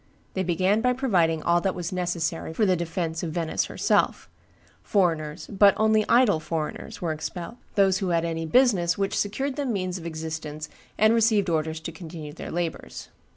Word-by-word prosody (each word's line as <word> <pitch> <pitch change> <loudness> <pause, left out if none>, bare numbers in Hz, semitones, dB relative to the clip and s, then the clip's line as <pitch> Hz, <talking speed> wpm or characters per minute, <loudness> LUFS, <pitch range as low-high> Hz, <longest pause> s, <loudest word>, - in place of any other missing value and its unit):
They 190 - -1
began 185 +4 +1
by 250 +1 +3
providing 175 - +1
all 170 0 +3
that 190 +1 -1
was 175 -1 -4
necessary 170 -3 -2
for 215 - +3
the 185 -2 +3
defence 165 -1 -3
of 165 -3 -4
Venice 165 -2 -1
herself; - - +1 0.5
foreigners, 160 -6 0
but 200 0 +4
only 215 0 +3
idle 235 -9 +5
foreigners, 155 +2 -5
were 165 - 0
expelled; 170 +7 -5 0.2
those 195 -2 +4
who 190 -3 -1
had 170 -1 +1
any 165 -1 -3
business 185 -5 +3
which 195 -1 -1
secured 265 +7 -1
them 280 -4 -1
means 185 -3 -2
of 170 - -7
existence 155 -2 -5 0.3
received 215 -2 +4
orders 160 0 -1
to 165 - -5
continue 160 -2 -8
their - - -8
labors. 170 -1 -4
175 Hz, 170 wpm, -25 LUFS, 160-205 Hz, 0.5 s, idle